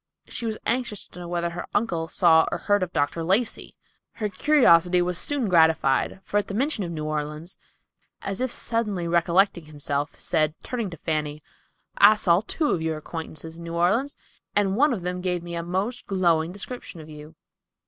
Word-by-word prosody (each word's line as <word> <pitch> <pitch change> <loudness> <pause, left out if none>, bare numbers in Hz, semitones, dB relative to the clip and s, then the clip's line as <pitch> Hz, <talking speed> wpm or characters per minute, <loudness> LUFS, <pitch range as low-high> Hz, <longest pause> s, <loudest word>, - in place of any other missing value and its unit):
She 235 - -4
was 220 -1 -2
anxious 235 -4 -1
to - - -13
know 175 - -7
whether 170 0 -2
her 175 +1 -6
uncle 175 -7 0
saw 160 -1 +4
or - - -1
heard 205 -1 +1
of 180 -1 -2
Dr. 155 +2 -1
Lacey. 200 +7 0 0.4
Her 210 -2 -3
curiosity 185 - +4
was 180 0 0
soon 270 +5 0
gratified, 160 -1 +3
for, 205 - -1
at 205 - -4
the 200 - -5
mention 260 -2 0
of 175 - -4
New 155 -2 -4
Orleans, 150 +2 -4 0.7
as 195 +3 -3
if 255 - 0
suddenly 210 -7 -1
recollecting 170 +1 +2
himself, 145 -1 -3
said, 155 0 +1
turning 235 -5 -3
to 165 - -9
Fanny, 150 -1 -3 0.6
"I 215 - +8
saw 175 -3 +3
two 305 -3 +1
of 165 - 0
your 160 -1 -1
acquaintances 160 0 -7
in 170 - -9
New 170 0 -6
Orleans, 215 +12 +1 0.4
and 195 -2 +2
one 290 +6 +4
of 220 -7 -2
them 180 +1 -3
gave 180 -2 -1
me 175 0 -7
a 170 - -2
most 190 +8 -3
glowing 170 -4 +2
description 200 -2 -8
of 155 - -10
you." 150 +1 -11
175 Hz, 190 wpm, -25 LUFS, 160-205 Hz, 0.7 s, I